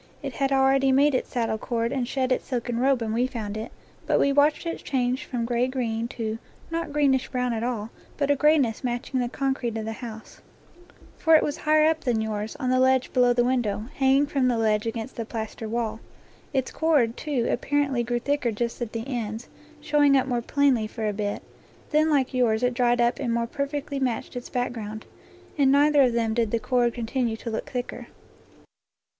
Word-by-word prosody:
It 275 -2 -4
had 275 +3 0
already 270 0 +4
made 280 +2 +4
its 255 - -1
saddle 225 -3 -1
cord 230 0 -1
and 260 -3 -1
shed 260 0 -1
its 255 - 0
silken 240 -2 -2
robe 265 -1 +2
when 220 -1 -2
we 245 +3 +1
found 220 -5 -5
it, 220 +1 -5 0.4
but - - +3
we 280 - +3
watched 290 +3 +3
it 335 - -4
change 255 +1 -1
from 240 -4 -3
gray 240 +1 +1
green 235 -3 -2
to, 225 -2 -4 0.3
not 330 -2 -3
green 285 -2 +3
ish 265 -1 0
brown 250 -2 -1
at 220 - -2
all, 230 -2 -3 0.3
but 285 0 +1
a - - +4
grayness 285 -5 +2
matching 245 +1 -2
the 245 -1 -1
concrete 265 -4 -2
of 220 - -4
the 225 - -3
house; 225 -2 -9 0.8
for 325 -1 +5
it 310 - +5
was 290 - -1
higher 310 0 +3
up 320 0 +2
than 245 -6 0
yours, 215 0 -3
on 255 -1 -1
the 255 - +3
ledge 260 0 +2
below 250 -1 +4
the 240 0 +3
window, 240 -4 0
hanging 270 +1 +4
from 275 -3 0
the 245 -2 +1
ledge 215 -1 +1
against 225 +3 -5
the 230 - -2
plaster 220 -1 -5
wall. 225 -1 -2 0.5
Its 265 -3 -1
cord, 290 -8 +2
too, 275 -6 -2
apparently 280 -1 0
grew 240 +1 -1
thicker 270 -1 0
just 235 +3 -3
at 235 -2 -4
the 230 +2 -4
ends, 230 -3 -4 0.3
showing 290 -2 +4
up 260 - +2
more 245 -2 -1
plainly 260 -3 +2
for 220 0 -4
a 210 - -1
bit; 205 0 -3 0.5
then 310 +1 +3
like 275 -3 +1
yours 240 -2 +2
it 250 0 +2
dried 240 0 +2
up 240 +1 +2
and 250 -4 -1
more 235 0 0
perfectly 280 +2 -3
matched 250 -1 -2
its 245 - -6
back 245 -1 -1
ground. 215 -2 -7 0.5
In 275 -2 +4
neither 290 +1 +5
of 250 -3 +4
them 230 -1 0
did 230 -1 +1
the 230 - +1
cord 240 0 +1
continue 235 -1 -1
to 230 - -6
look 220 - -4
thicker. 250 -2 -5
245 Hz, 210 wpm, -25 LUFS, 230-275 Hz, 0.8 s, for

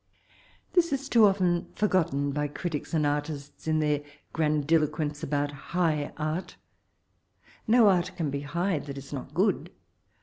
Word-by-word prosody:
This 340 -3 +3
18 275 0 -2
too 230 -2 +6
often 180 -3 +1
forgotten 155 -9 +1
by 145 +1 -1
critics 155 +1 -4
and 155 -2 +2
artists, 145 0 -3
in 155 0 +2
their 150 -1 +1 0.3
grandiloquence 150 -1 +1
about 145 0 -1
''high 155 0 -1
art" 155 +4 -3 1.1
No 230 0 +6
art 185 -1 +3
can 155 -5 -1
be 140 - -2
high 170 +4 -1
that 140 -1 -7
is 135 +1 -9
not 135 - -7
good. - - +1
155 Hz, 140 wpm, -28 LUFS, 145-180 Hz, 1.1 s, too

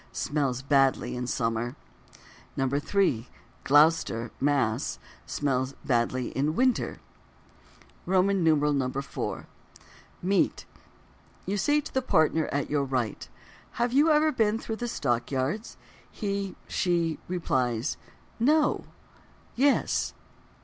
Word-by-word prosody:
smells 135 -3 -1
badly 135 -2 +2
in 125 0 -3
summer. 115 +1 -1 0.8
3. 140 - +1 0.4
Gloucester 145 -6 +3
(Mass.) 135 -6 +1 0.3
smells 130 -2 -1
badly 125 0 0
in 150 +4 -1
winter. 255 +2 +1 1.1
IV. 155 -8 +1 1.1
Meat. 195 +2 +1 0.8
You 195 - -1
say 295 +8 +2
to - - -10
the 265 - +1
partner 160 -8 +2
at 145 -1 -2
your 145 -1 0
right: 130 -5 -2 0.4
"Have 240 +1 -1
you 295 +4 +5
ever 310 0 +4
been 220 -5 +1
through 225 -1 -5
the 240 - -3
Stock 120 - -1
Yards?" 140 - -2 0.3
She 200 -2 -3
(he) 170 -3 0
replies: 130 -8 -1 0.4
"No." 300 +5 +3 0.7
("Yes.") 275 +3 +2
150 Hz, 100 wpm, -27 LUFS, 130-200 Hz, 1.1 s, you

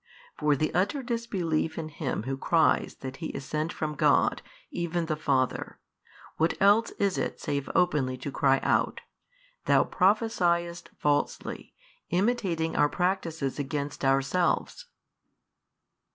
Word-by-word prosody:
For 150 -1 +2
the 155 +3 -1
utter 200 +10 0
disbelief 190 -10 -1
in 160 -1 -4
Him 145 -7 -3
Who 135 +3 -2
cries 160 +4 +2
that 135 0 -6
He 165 - -4
is 135 - -6
sent 155 +3 -2
from 155 -1 -3
God, - - +3 0.3
even 170 0 -2
the 155 -1 -1
Father, 135 -4 -1 0.6
what 160 +1 +1
else 205 +4 +5
is 200 -2 +1
it - - -3
save 140 -2 -3
openly 145 -8 +2
to 135 +2 -5
cry 135 0 +3
out, - - +1 0.6
Thou - - +5
prophesiest 180 -4 +1
falsely, 145 -1 -1 0.3
imitating 180 -4 0
our 145 0 +4
practices 170 -7 -1
against 145 +1 -3
ourselves? 135 - +1
160 Hz, 125 wpm, -28 LUFS, 140-180 Hz, 0.6 s, else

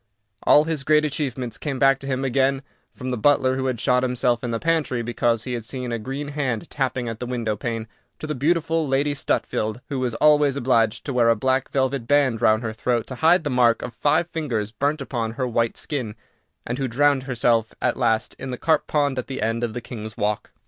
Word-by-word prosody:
All 150 - +6
his 155 -3 -3
great 150 +1 +3
achievements 130 -6 -3
came 140 -3 -3
back 135 0 +4
to 135 - -8
him 135 0 -1
again, 135 +1 +1 0.3
from 130 -1 -6
the 125 - -1
butler 130 +2 +3
who 130 0 -1
had 125 -3 -2
shot 125 +2 +2
himself 125 -1 0
in 120 - -2
the 115 - -1
pantry 155 -6 0
because 120 -1 0
he 125 - -4
had 120 -2 -3
seen 125 +3 -5
a 115 - -2
green 135 +5 -5
hand 135 -7 -2
tapping 130 -3 -1
at 115 -1 -5
the 125 - -4
window 115 -4 -2
pane, 115 +1 -4 0.3
to - - -7
the 155 - -2
beautiful 160 +2 +1
Lady 140 +2 +1
Stutfield, 110 -5 -1
who 140 -2 -2
was 125 -3 -1
always 150 -2 +4
obliged 120 -4 +1
to 140 - -3
wear 120 -2 +4
a 115 - +5
black 130 +3 0
velvet 130 -3 -1
band 140 -5 +2
round 110 +2 +3
her 110 -1 -3
throat 120 +1 -1
to - - -8
hide 165 +2 +5
the 145 - -2
mark 120 -2 +3
of 120 - -6
five 150 +3 +1
fingers 120 -11 -2
burnt 145 +6 -1
upon 115 -4 -3
her 130 +1 -2
white 115 -1 0
skin, 125 -8 -4 0.5
and 125 +3 -3
who 135 - 0
drowned 140 +3 +2
herself 115 -2 +1
at - - +1
last 115 -3 0
in 130 - -5
the 125 - -4
carp 155 +2 +1
pond 145 -3 +1
at 125 - -5
the 135 - -5
end 115 +2 -1
of 115 -2 -2
the 120 - -5
King's 110 -2 -8
Walk. 105 0 -1
130 Hz, 225 wpm, -23 LUFS, 115-140 Hz, 0.5 s, All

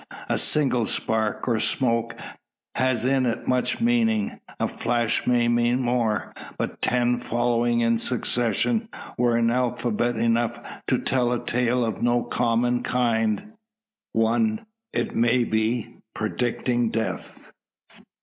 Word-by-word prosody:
A - - +1
single 130 -6 +2
spark, 110 +1 -1
or 115 -3 +2
smoke, 115 -2 0 0.6
has 125 -2 0
in 130 -1 +2
it 115 0 -3
much 125 0 +1
of - - -11
meaning. 230 -1 +1 0.2
A 115 - +1
flash 120 -1 -1
may 120 -1 +3
mean 120 +1 +2
more; 120 -4 0 0.2
but - - -4
ten 120 0 +1
following 120 0 +1
in 115 -1 +2
succession 125 - 0 0.3
were 120 -1 +2
alphabet 120 0 0
enough 115 +1 +1 0.3
to - - +2
tell 125 -2 0
a 120 - -2
tale 125 0 +1
of 110 -4 -4
no 120 0 +2
common 120 +1 +1
kind 115 - 0 0.6
one, 215 - +1 0.3
it - - -2
may 120 +1 +3
be, 115 +1 -1 0.2
predicting 120 +2 0
death. 110 0 -4
120 Hz, 125 wpm, -24 LUFS, 115-125 Hz, 0.6 s, may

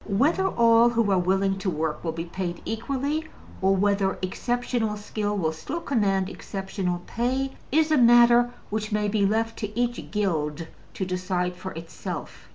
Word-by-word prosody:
Whether 295 - +2
all 235 -5 +5
who 230 -3 +1
are 190 - +4
willing 195 +2 +1
to 195 - -1
work 155 -2 -2
will 165 - -1
be 165 +1 -4
paid 175 0 -4
equally, 275 +7 -2 0.4
or 190 +1 +4
whether 200 0 +1
exceptional 235 +2 -1
skill 210 0 -3
will 160 -5 +1
still 160 - -5
command 200 - +1
exceptional 190 -3 -4
pay, 260 +3 -1 0.2
is 315 +2 +3
a 305 - +5
matter 240 0 +6 0.2
which 215 +1 -2
may 210 0 +1
be 205 -1 +2
left 225 +2 0
to 210 +1 -4
each 240 0 -1
guild 165 -6 -1 0.3
to 190 - -2
decide 180 -1 -2
for 190 +1 -7
itself. 165 +1 -7
205 Hz, 165 wpm, -25 LUFS, 185-235 Hz, 0.4 s, matter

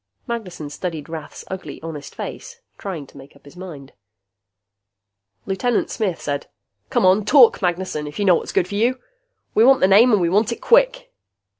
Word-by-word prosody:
Magnessen 180 -11 -6
studied 160 -3 -5
Rath's 160 -2 -8
ugly, 190 -1 -7
honest 150 -3 -8
face, 480 -1 -8 0.2
trying 175 -8 -5
to - - -18
make 135 +1 -15
up 140 - -22
his 145 - -15
mind. 160 -7 -10 1.5
Lieutenant 205 +5 -1
Smith 195 -6 -2
said, 145 -1 -4 0.4
"Come - - +1
on, 190 +3 +4
talk, 245 +1 +5
Magnessen, 175 -4 -2
if 150 - -9
you 205 - 0
know 185 - +6
what's - - -1
good 180 - +1
for 200 - -9
you. 240 +5 +1 0.5
We 220 - +4
want 265 +2 +6
the 185 - +4
name 215 +6 +6
and 210 - +4
we 175 - +1
want 210 +6 +2
it 235 - -4
quick." - - +2
190 Hz, 180 wpm, -21 LUFS, 160-230 Hz, 1.5 s, know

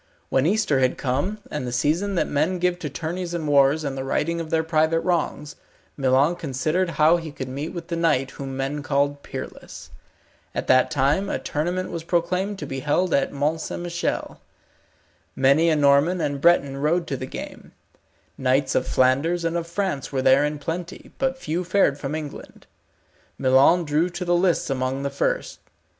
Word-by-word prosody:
When 135 +3 +2
Easter 195 -8 +2
had 130 -1 +1
come, 140 +11 -1
and 150 -4 -3
the - - -3
season 160 +11 0
that - - +1
men 155 +6 0
give 180 0 0
to 150 - -4
tourneys 170 +4 -4
and 160 -3 -3
wars 145 +2 +4
and 140 -2 -3
the 135 - -4
righting 165 +5 -1
of 160 - -7
their 160 0 +1
private 160 0 +2
wrongs, 160 -4 -2 0.4
Milon 135 +5 +2
considered 155 +5 -1
how 155 +3 +5
he 165 -2 -7
could 130 -2 -6
meet 140 +5 -4
with 170 -2 -8
the 170 - -1
knight 150 -6 +1
whom 135 -1 -6
men 135 +2 -2
called 145 0 0
Peerless. 130 -2 -9 0.6
At - - -2
that 130 0 +4
time 150 +7 +1
a - - -1
tournament 175 +5 -2
was 170 -1 -5
proclaimed 180 +4 -1
to - - -6
be 135 -1 -5
held 155 +5 0
at 140 - +2
Mont 150 +3 -1
St. - - -5
Michel. 175 0 -3 0.9
Many 140 +5 +4
a 160 - +3
Norman 145 +5 +3
and 145 -3 -2
Breton 145 -5 +3
rode 160 +5 +1
to 140 - -3
the 130 0 -5
game; - - -9 0.7
knights 130 +1 +1
of 130 - 0
Flanders 150 +7 +2
and 165 0 -1
of 170 -1 -2
France 170 -6 -3
were 130 -2 -1
there 135 +2 +5
in 150 0 -1
plenty, 165 +4 -6
but 265 0 0
few 175 -6 -3
fared 180 -6 +2
from 145 +1 -3
England. 155 -2 -8 0.7
Milon 140 +7 +4
drew 155 +4 +1
to 180 +1 -5
the 175 - +2
lists 175 -4 +1
amongst 130 +1 -2
the 140 - -2
first. 140 - -2
155 Hz, 185 wpm, -23 LUFS, 140-175 Hz, 0.9 s, how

